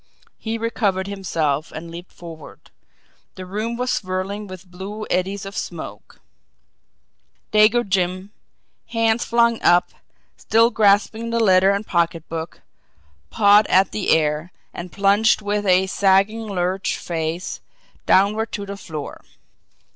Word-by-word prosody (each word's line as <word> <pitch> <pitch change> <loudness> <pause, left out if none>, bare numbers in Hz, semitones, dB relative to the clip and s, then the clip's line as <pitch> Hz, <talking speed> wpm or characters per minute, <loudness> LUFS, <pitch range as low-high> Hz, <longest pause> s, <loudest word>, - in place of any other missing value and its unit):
He 225 0 -3
recovered 210 -4 -1
himself 165 -7 -2
and 165 +1 -8
leaped 175 +2 -10
forward. 165 -3 -12 0.6
The 185 - -8
room 215 +5 -4
was 250 +1 -1
swirling 190 +2 -3
with 185 0 -10
blue 195 +4 -7
eddies 195 +2 -1
of 195 +1 -8
smoke; - - -7 1.3
Dago 215 +2 +4
Jim, 185 +1 -1 0.6
hands 230 0 +1
flung 235 -1 +2
up, 175 +1 +4 0.5
still 230 +2 +3
grasping 215 +2 +2
letter 195 -5 +4
and 200 +2 0
pocketbook, 165 -2 -2 0.7
pawed 205 - +5
at 190 +1 +3
the 210 - -3
air 155 +2 +1 0.2
and 175 0 -8
plunged 205 +2 +3
with 205 0 -1
a 185 0 +4
sagging 195 +3 +2
lurch 185 -1 -1
face 165 +1 -4 0.5
downward 215 +3 +3
to 205 - -4
the 200 0 -7
floor. 155 -6 -7
195 Hz, 120 wpm, -21 LUFS, 180-215 Hz, 1.3 s, pawed